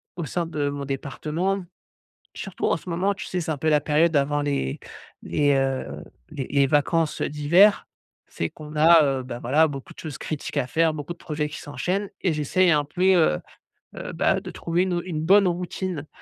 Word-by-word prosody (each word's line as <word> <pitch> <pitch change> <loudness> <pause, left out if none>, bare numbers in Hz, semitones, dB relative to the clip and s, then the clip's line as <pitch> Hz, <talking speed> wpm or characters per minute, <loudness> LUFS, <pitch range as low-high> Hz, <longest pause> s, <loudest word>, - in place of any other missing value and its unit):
au 170 -2 -4
sein 170 +4 -2
de 150 -3 -2
mon 140 0 -5
département, 155 +8 -2 0.7
surtout - - -5
en - - +2
ce - - -17
moment, 185 +4 0
tu - - -7
sais 180 - -2
c'est 165 -1 -3
un 150 - -2
peu 160 +3 0
la 150 -1 +4
période 155 +2 +2
avant 145 +1 +2
les 140 - -2 0.4
les, 145 -1 +2
heu, 135 -1 -2 0.3
les 135 -3 -5
les 140 -1 +3
vacances, 150 +3 +1
heu, - - 0
d'hiver. 170 +8 +4 0.5
C'est 85 - -3
qu'on 150 0 -11
a, 160 +1 +7 0.2
heu, - - -9
bah, 125 -1 -6
voilà, 145 +7 +3
beaucoup 135 -2 -8
de - - -16
choses 155 -3 -6
critiques 155 -3 -5
à 125 - +1
faire, 160 +3 +2
beaucoup 150 +2 -5
de - - -22
projets 150 -3 -3
qui 155 - -8
s'enchaînent 190 +7 -2
et 180 - +1
j'essaie 155 +5 +2
un 150 -3 +3
puis, 185 +5 +2
heu 155 - +3 0.6
heu, - - -6
bah, - - +2
de - - -8
trouver, 170 +1 -1
une 185 -1 -1
au 175 - -1
une 165 -4 -4
bonne 195 +4 +5
routine, 175 -2 -3
155 Hz, 205 wpm, -24 LUFS, 145-175 Hz, 0.7 s, a